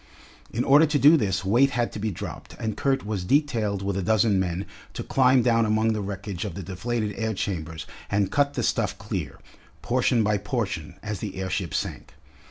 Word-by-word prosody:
In 120 - -1
order 145 +4 +6
to 150 0 +1
do 145 +3 +7
this 100 -8 0
weight 120 +8 +4
had 120 -1 +1
to - - -6
be 110 +1 -1
dropped, 95 - -7
and 110 -3 -3
Kurt 135 -5 0
was 105 -4 -2
detailed 110 -5 +1
with 100 -1 -1
a 100 - -1
dozen 105 0 +3
men 90 +1 -2 0.3
to - - -4
climb 130 -1 +4
down 115 -1 +3
among 110 +1 +2
the 105 - -2
wreckage 100 -2 -5
of 100 -6 -5
the 95 - -5
deflated 105 +4 -2
air 110 -1 -1
chambers 80 -5 -4 0.2
and 100 -2 +1
cut 145 0 +2
the - - -1
stuff - - 0
clear, - - -5 0.5
portion 125 -2 +2
by 105 -1 +1
portion, 100 -6 -3
as 105 -3 -4
the 100 -1 -5
airship 95 -2 -3
sank. - - -4
105 Hz, 195 wpm, -25 LUFS, 95-120 Hz, 0.5 s, do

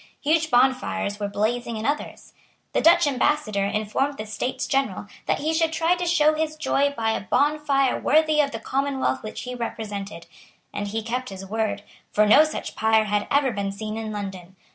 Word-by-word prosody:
Huge 315 +2 +2
bonfires 250 -5 +1
were 205 - -1
blazing 225 +3 -1
in 215 - -4
others. 290 +2 -3 0.4
The - - +2
Dutch 330 0 +6
ambassador 255 -7 +1
informed 215 +7 -1
the 215 - -5
States 220 +4 -3
General 270 -9 -1 0.2
that - - +2
he 310 +3 -1
should 325 0 +2
try 330 +2 +2
to 355 0 -2
show 310 -3 +4
his 310 0 -2
joy 285 -2 +1
by 225 -1 +1
a - - -2
bonfire 280 +3 +1
worthy 310 0 +3
of 280 - 0
the 225 - -6
commonwealth 270 +3 -1
which 215 - -7
he 250 - -6
represented; 205 -6 -5 0.5
and 205 0 -3
he 220 +2 -3
kept 250 +3 -3
his 195 -1 -8
word; 205 0 -2 0.3
for 210 - +3
no 215 +8 +7
such 310 - -5
pyre 220 0 +3
had 205 -1 -1
ever 280 -2 +2
been 200 -2 -3
seen 215 +2 -5
in 220 -1 -4
London. 190 -3 -7
235 Hz, 185 wpm, -24 LUFS, 210-290 Hz, 0.5 s, no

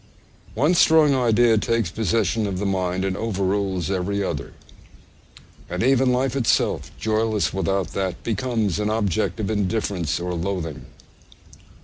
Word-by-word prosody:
One 145 +9 +3
strong 160 -4 +5
idea 120 -3 +3
takes 115 -5 0
possession 110 +1 0
of 95 -2 -3
the 100 - -2
mind 95 -1 -1
and 95 -1 -1
overrules 95 -4 -1
every 100 +2 -1
other; - - -4 1.2
and - - -2
even 130 0 +3
life 130 +1 0
itself, 130 -4 +1
joyless 110 -5 0
without 95 -1 -1
that, 95 -2 -3
becomes 110 -3 -1
an 105 0 0
object 110 0 -1
of 105 -1 -2
indifference 100 -6 -1
or 90 +1 -3
loathing. 85 -3 -4
105 Hz, 130 wpm, -23 LUFS, 95-115 Hz, 1.2 s, strong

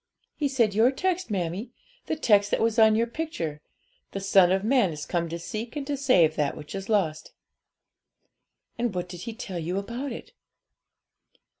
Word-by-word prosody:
'He 295 - 0
said 240 -7 +2
your 225 +4 +5
text, 365 +4 -1
mammie 190 +2 -2 0.4
the - - 0
text 205 -9 +3
that - - +1
was 225 0 +1
on 220 -1 +6
your 230 +1 +2
picture: 235 - -4 0.5
"The 195 - -3
Son 190 -2 +5
of 190 +1 +1
Man 235 -3 +3
is 150 -1 -6
come 170 -2 -1
to 170 - -4
seek 220 - -6
and 290 -2 -3
to 290 0 -2
save 180 - +4
that 145 -2 0
which 150 - -9
is 195 +1 -6
lost."' 175 -8 0 1.5
'And 235 -5 -1
what 180 0 -2
did 175 -1 -9
he - - -5
tell 195 -7 -5
you 175 +3 -2
about 235 +7 -4
it?' 360 - -9
210 Hz, 180 wpm, -26 LUFS, 175-245 Hz, 1.5 s, on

